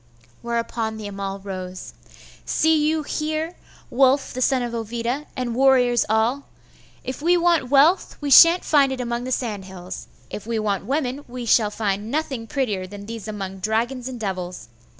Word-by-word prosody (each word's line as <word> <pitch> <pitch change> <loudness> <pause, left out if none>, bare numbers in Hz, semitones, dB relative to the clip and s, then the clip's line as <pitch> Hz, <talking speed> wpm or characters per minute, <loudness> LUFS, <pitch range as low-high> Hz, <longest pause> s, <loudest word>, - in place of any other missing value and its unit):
Whereupon 230 -1 -2
the 215 - -7
Amal 195 -1 -4
rose. 185 -2 -7 0.5
'See 315 -1 +2
you 315 0 0
here, 310 +3 -3 0.4
Wulf 270 +2 +3
the 255 - -4
son 255 -1 +2
of 240 -1 -4
Ovida, 235 +5 -3
and 250 -2 -2
warriors 250 -2 +4
all! 225 +6 +1 0.6
If 260 +2 -5
we 350 +3 +4
want 340 -6 +2
wealth, 290 +7 +4
we 290 -1 -3
shan't 335 +6 +8
find 280 -3 +4
it 265 - -4
among 240 0 -3
the 255 - -4
sand 215 -7 -2
hills. 185 -1 -8 0.2
If 210 - -7
we 230 -1 -1
want 205 -3 -1
women, 275 0 -1
we 245 0 -6
shall 220 -2 +4
find 205 0 -2
nothing 265 -5 -2
prettier 220 -10 -2
than 200 +1 -9
these 225 -1 -7
among 195 -3 -5
dragons 235 +5 -1
and 255 -2 -6
devils. 185 - -5
240 Hz, 170 wpm, -23 LUFS, 210-275 Hz, 0.6 s, shan't